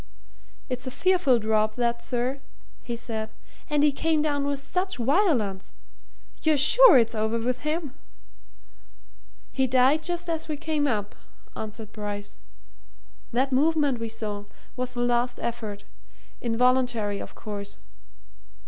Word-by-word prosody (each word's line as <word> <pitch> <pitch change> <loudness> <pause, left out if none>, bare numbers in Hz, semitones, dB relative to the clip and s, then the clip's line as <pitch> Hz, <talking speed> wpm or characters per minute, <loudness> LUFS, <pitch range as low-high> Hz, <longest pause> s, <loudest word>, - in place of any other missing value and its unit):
"It's 255 0 -5
a - - -1
fearful 355 -4 +3
drop, 215 -1 +1
that, 235 -1 0
sir," 250 +2 -2 0.4
he 240 - -5
said. 220 -2 -4 0.4
"And 295 -1 +2
he 295 - +5
came 315 +3 0
down 285 -2 0
with 285 0 -1
such 365 +7 -2
violence. 245 - +1 0.7
You're 315 -2 +3
sure 395 - +8
it's 230 -2 +3
over 220 +1 0
with 245 +2 -2
him?" 305 -2 -2 1.6
"He 265 -1 +1
died 260 +5 +4
just 350 +1 -2
as 325 -1 -3
we 305 -2 -3
came 305 -1 -1
up," 210 -5 -2 0.4
answered 215 0 -7
Bryce. 205 -1 -6 0.9
"That 260 +3 +1
movement 290 -1 +2
we 230 0 -4
saw 210 -2 -5 0.3
was 250 -1 -4
the 240 - -1
last 245 0 +1
effort 220 -4 -5 0.6
involuntary, 235 -3 +1
of - - -9
course. 205 -1 -7
250 Hz, 130 wpm, -26 LUFS, 220-295 Hz, 1.6 s, sure